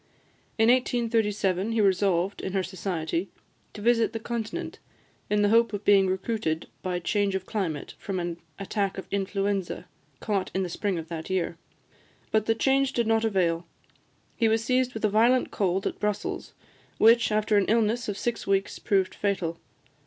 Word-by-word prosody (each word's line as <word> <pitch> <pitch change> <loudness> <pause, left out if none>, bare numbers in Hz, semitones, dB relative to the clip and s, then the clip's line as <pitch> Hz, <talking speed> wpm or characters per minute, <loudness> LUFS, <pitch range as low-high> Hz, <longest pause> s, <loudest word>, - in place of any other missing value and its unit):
In 225 0 +4
1837, 225 -5 +1
he 225 - +1
resolved, 195 -1 +2
in 190 - -4
her 190 -1 +1
society, 180 -1 -3 0.5
to 205 - -7
visit 230 -1 +3
the 225 - -3
Continent, 225 -1 -4 0.5
in 210 0 +2
the 205 - +4
hope 230 +1 +4
of 205 0 -4
being 195 -2 +5
recruited 190 -4 -2
by 180 -1 -2
change 200 +2 0
of 190 -1 -3
climate 175 -10 -3
from 190 -2 -3
an 175 -1 -3 0.2
attack 200 0 -2
of 190 - -5
influenza 195 -1 -1 0.3
caught 200 -3 -1
in 190 - +1
the 180 - -3
spring 195 +1 -2
of 165 -1 -5
that 165 0 -6
year. 180 -3 -1 0.8
But 220 -1 +2
the 225 - +3
change 270 +3 +2
did 235 - +1
not 225 0 +2
avail; 175 -5 +1 0.7
he 230 - +2
was 225 0 +2
seized 255 +1 +1
with 220 - -1
a - - +5
violent 235 +5 +3
cold 190 0 0
at - - -3
Brussels, 210 -1 -3 0.4
which, 230 +1 +5
after 215 0 +2
an 200 - +3
illness 230 +1 +1
of 205 - -3
six 235 +1 -3
weeks, 195 0 0
proved 195 -3 +1
fatal. 175 -5 -2
205 Hz, 170 wpm, -27 LUFS, 190-225 Hz, 0.8 s, being